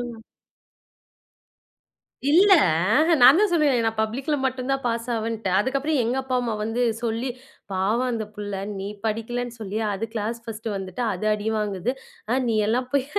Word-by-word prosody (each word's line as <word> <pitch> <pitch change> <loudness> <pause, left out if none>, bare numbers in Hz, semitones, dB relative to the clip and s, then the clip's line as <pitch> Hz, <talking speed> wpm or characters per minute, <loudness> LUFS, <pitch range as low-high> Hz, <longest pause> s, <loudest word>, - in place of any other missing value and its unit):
ம். 240 -1 -6 2.1
இல்ல. 380 +6 +6 0.5
அஹ்ன். 320 +1 +4
நான் 265 +6 +9
தான் 420 -2 +3
சொன்னேனே, 300 -7 +3
நான் 225 0 -1
பப்ளிக்ல 260 +7 -2
மட்டும் 260 0 -2
தான் 270 0 0
பாஸ் 230 0 -2
ஆவேன்ட்டு. 225 -3 -2
அதுக்கப்புறம் 275 +6 0
எங்க 235 +3 -1
அப்பா, 260 -1 -1
அம்மா 240 -2 -2
வந்து 225 +3 -1 0.2
சொல்லி, 230 +2 -2 0.4
"பாவம் 210 +7 +1
அந்த 220 -2 -2
புள்ள. 205 -1 -5 0.2
நீ 195 - -4 0.2
படிக்கலன்னு 230 +2 -2
சொல்லி, 210 -1 -4 0.2
அது 200 +3 -3
கிளாஸ் 225 +1 -2
ஃபர்ஸ்ட் 225 0 -6
வந்துட்டு, 190 +3 -5
அது 185 +3 -5
அடி 210 +1 -2
வாங்குது. 210 +1 -1 0.4
ஆ. - - +2
நீ 230 - +1
எல்லாம் 245 +4 0
போய்" 280 -2 +2
230 Hz, 160 wpm, -24 LUFS, 215-260 Hz, 2.1 s, நான்